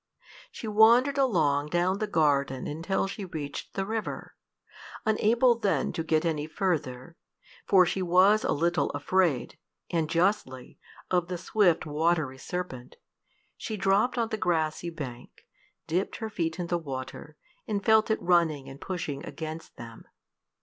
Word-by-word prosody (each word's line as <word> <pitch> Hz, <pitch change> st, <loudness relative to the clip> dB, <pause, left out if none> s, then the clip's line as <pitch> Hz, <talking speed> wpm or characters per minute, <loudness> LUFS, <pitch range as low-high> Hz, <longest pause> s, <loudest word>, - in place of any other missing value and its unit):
She 230 Hz, -, -8 dB
wandered 235 Hz, +6 st, +5 dB
along 155 Hz, -, +2 dB
down 175 Hz, +4 st, 0 dB
the 215 Hz, -, -1 dB
garden 140 Hz, -7 st, +1 dB
until 165 Hz, +7 st, -1 dB
she 195 Hz, +1 st, -6 dB
reached 155 Hz, -6 st, -6 dB
the 195 Hz, -, -1 dB
river. 220 Hz, +1 st, -5 dB, 0.7 s
Unable 230 Hz, +3 st, +3 dB
then 205 Hz, -4 st, 0 dB
to 165 Hz, -, -2 dB
get 160 Hz, +1 st, +1 dB
any 155 Hz, -2 st, -1 dB
further 160 Hz, -5 st, -3 dB, 0.5 s
for 185 Hz, -2 st, +6 dB
she 190 Hz, +2 st, -2 dB
was 185 Hz, +4 st, +4 dB
a -, -, 0 dB
little 170 Hz, +4 st, +1 dB
afraid, 160 Hz, -2 st, 0 dB, 0.3 s
and 165 Hz, -3 st, 0 dB
justly, 165 Hz, -8 st, -1 dB, 0.3 s
of 180 Hz, -2 st, +2 dB
the 180 Hz, 0 st, -4 dB
swift 185 Hz, -1 st, +2 dB
watery 155 Hz, -3 st, 0 dB
serpent 135 Hz, -7 st, -6 dB, 0.6 s
she 215 Hz, -, -5 dB
dropped 195 Hz, +6 st, +2 dB
on 230 Hz, -2 st, 0 dB
the 220 Hz, -, -2 dB
grassy 170 Hz, -3 st, -1 dB
bank, 130 Hz, -7 st, -9 dB, 0.4 s
dipped 180 Hz, +4 st, -1 dB
her 220 Hz, -1 st, -5 dB
feet 165 Hz, -3 st, -2 dB
in 175 Hz, -, -3 dB
the 175 Hz, 0 st, -1 dB
water, 135 Hz, +1 st, -7 dB, 0.3 s
and 205 Hz, -2 st, -2 dB
felt 220 Hz, 0 st, +4 dB
it 220 Hz, -, +1 dB
running 165 Hz, -6 st, +2 dB
and 135 Hz, +1 st, -11 dB
pushing 155 Hz, -6 st, -4 dB
against 160 Hz, 0 st, -7 dB
them. 115 Hz, -1 st, -11 dB
175 Hz, 145 wpm, -28 LUFS, 150-200 Hz, 0.7 s, for